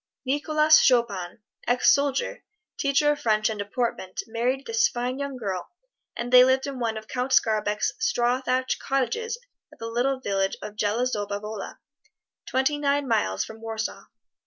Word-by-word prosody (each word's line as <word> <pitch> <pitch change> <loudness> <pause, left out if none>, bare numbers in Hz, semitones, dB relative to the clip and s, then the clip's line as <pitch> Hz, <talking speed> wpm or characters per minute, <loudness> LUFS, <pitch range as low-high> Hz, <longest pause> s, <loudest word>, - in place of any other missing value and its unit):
Nicholas 305 +3 +4
Chopin, 220 -6 +1 0.2
ex 245 +1 +5
soldier, 280 -1 -1 0.3
teacher 280 +1 +2
of 295 - -2
French 215 -1 +2
and 215 - -6
Deportment, 205 -2 -3
married 245 +4 -1
this 455 +1 +3
fine 250 - -3
young 280 -2 -4
girl, 195 -6 -4 0.5
and 240 +1 -4
they 250 0 +10
lived 260 +1 +2
in 275 -2 -5
one 225 -2 -1
of 220 0 -9
Count 255 +1 -3
Skarbek's 215 -3 +2
straw 250 - +1
thatched 255 0 0
cottages 455 - -1 0.3
at - - -17
the 230 - -7
little 245 +4 0
village 195 -5 -1
of 210 - -8
Zelazowa 210 -1 -1
Wola, 210 0 -7 0.7
twenty 265 +3 +1
nine 285 -1 +1
miles 95 - +1
from 220 0 -11
Warsaw. 225 -1 -4
245 Hz, 155 wpm, -25 LUFS, 215-275 Hz, 0.7 s, they